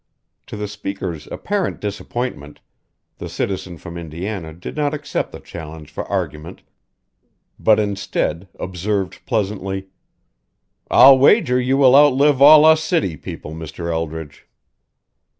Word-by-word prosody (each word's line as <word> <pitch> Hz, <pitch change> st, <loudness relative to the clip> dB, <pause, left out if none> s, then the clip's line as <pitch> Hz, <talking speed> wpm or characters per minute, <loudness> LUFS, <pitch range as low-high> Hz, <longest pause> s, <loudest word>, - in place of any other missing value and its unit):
To -, -, -7 dB
the 105 Hz, 0 st, -4 dB
speaker's 95 Hz, -6 st, -6 dB
apparent 205 Hz, -1 st, -3 dB
disappointment, 105 Hz, -, -5 dB, 0.6 s
the -, -, -6 dB
citizen 95 Hz, -3 st, -4 dB
from 85 Hz, +1 st, -9 dB
Indiana 85 Hz, +2 st, -6 dB
did 85 Hz, +3 st, -9 dB
not 150 Hz, -1 st, 0 dB
accept 145 Hz, -1 st, -4 dB
the -, -, -9 dB
challenge 80 Hz, -2 st, -10 dB
for -, -, -5 dB
argument 80 Hz, +4 st, -4 dB, 1.0 s
but 110 Hz, -1 st, +4 dB
instead 100 Hz, -3 st, -2 dB
observed 95 Hz, +1 st, -3 dB
pleasantly: 95 Hz, -4 st, -2 dB, 1.0 s
"I'll 135 Hz, 0 st, +8 dB
wager 130 Hz, -, +4 dB
you 130 Hz, +2 st, +1 dB
will 135 Hz, -2 st, +6 dB
outlive 145 Hz, -1 st, +5 dB
all 150 Hz, +2 st, +9 dB
us 160 Hz, 0 st, +5 dB
city 155 Hz, -, 0 dB
people, 75 Hz, +1 st, -8 dB
Mr. 80 Hz, +1 st, -6 dB
Eldridge." 80 Hz, -2 st, -5 dB
100 Hz, 120 wpm, -20 LUFS, 85-130 Hz, 1.0 s, all